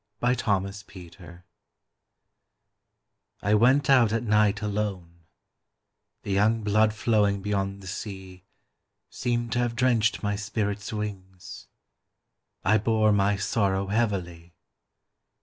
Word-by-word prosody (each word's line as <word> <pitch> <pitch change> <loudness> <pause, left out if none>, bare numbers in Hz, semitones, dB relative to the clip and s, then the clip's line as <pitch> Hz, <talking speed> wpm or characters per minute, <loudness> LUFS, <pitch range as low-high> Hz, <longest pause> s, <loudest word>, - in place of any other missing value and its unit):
Winter 105 -6 0
Stars 105 +1 -10 2.6
I 105 - +2
went 130 +6 +4
out 125 -5 +5
at 115 +1 -1
night 105 -1 +2
alone; 95 -5 -4 1.0
The 100 - -5
young 105 +3 +2
blood 110 +1 +3
flowing 105 -2 +1
beyond 100 -1 -2
the - - -10
sea 95 -1 -8 0.7
Seemed 120 -1 -2
to 120 - 0
have 120 -1 -1
drenched 115 -3 +1
my 105 0 0
spirit's 105 0 -3
wings 95 -4 -7 1.0
I 110 +2 +4
bore 110 0 +2
my 100 0 +2
sorrow 100 -1 -1
heavily. 90 -6 -2
105 Hz, 105 wpm, -26 LUFS, 100-110 Hz, 2.6 s, out